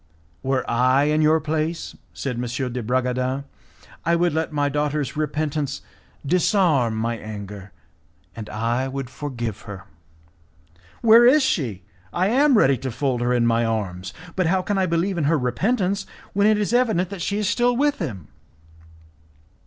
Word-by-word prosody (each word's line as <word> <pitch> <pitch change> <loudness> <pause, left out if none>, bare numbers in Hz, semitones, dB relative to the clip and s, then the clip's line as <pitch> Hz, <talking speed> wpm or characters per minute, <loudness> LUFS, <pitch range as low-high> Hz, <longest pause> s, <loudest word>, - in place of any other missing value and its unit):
"Were 135 0 -1
I 130 +3 +3
in 150 +1 +2
your 155 +1 +4
place," 155 +2 -3 0.2
said 135 -3 -4
M. 125 +1 -3
de 125 - -3
Bragadin, 125 +3 -1 0.6
"I 170 +1 +2
would 175 -1 +1
let 160 0 -1
my 145 -1 0
daughter's 145 -1 -1
repentance 150 -2 -2 0.4
disarm 160 - +2
my 115 +2 -1
anger, 100 -2 -8 0.6
and 110 -2 -7
I 120 +4 -1
would 135 -1 -5
forgive 120 -7 -5
her." 95 -1 -7 1.2
"Where 230 +1 +8
is 285 +3 +5
she? 120 - -1 0.3
I 185 - +1
am 270 +2 +4
ready 135 - +4
to 130 - -4
fold 125 0 -1
her 120 0 +1
in 120 -1 +2
my 115 0 +2
arms, 100 -5 -3 0.2
but 185 -3 +1
how 185 +2 +1
can 200 +1 -1
I 190 - +2
believe 170 +2 0
in 150 - 0
her 160 +2 +3
repentance 195 - 0 0.3
when 200 +1 +3
it 215 -1 +4
is 210 +2 -1
evident 220 -7 +2
that 195 -3 -6
she 200 +4 -1
is 210 -2 0
still 245 +3 +2
with 290 +1 +1
him." 105 - -5
145 Hz, 160 wpm, -23 LUFS, 120-185 Hz, 1.2 s, Where